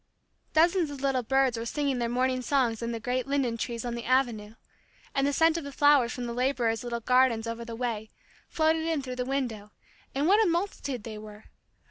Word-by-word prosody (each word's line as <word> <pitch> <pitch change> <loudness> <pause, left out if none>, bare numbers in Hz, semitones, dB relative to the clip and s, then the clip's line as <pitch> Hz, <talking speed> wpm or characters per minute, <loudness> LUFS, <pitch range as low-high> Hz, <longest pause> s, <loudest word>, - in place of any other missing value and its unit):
Dozens 335 +1 +3
of 285 -2 -8
little 270 -2 +1
birds 260 -1 +1
were 230 - -4
singing 280 -1 -1
their 235 -1 -1
morning 255 +1 0
songs 245 -4 +1
in 235 0 -2
the 230 - -4
great 250 +3 -2
linden 275 -4 0
trees 235 0 -4
on 240 - -3
the 235 0 -5
avenue, 235 -5 0 0.6
and 275 0 +1
the - - +1
scent 325 +3 +3
of - - -8
the 280 - -7
flowers 285 -4 +4
from 245 - -4
the 235 - -4
laborers' 245 -3 0
little 235 -1 -3
gardens 250 -2 +3
over 230 0 -4
the 230 0 -7
way, 225 -3 -3 0.4
floated 320 0 +1
in 320 -4 0
through 255 -1 -6
the 250 - -1
window, 245 -6 -3 0.5
and 280 +2 +1
what 415 +4 +5
a 400 - +2
multitude 335 - -2
they 215 -1 -7
were! 210 0 -11
255 Hz, 210 wpm, -28 LUFS, 230-280 Hz, 0.6 s, what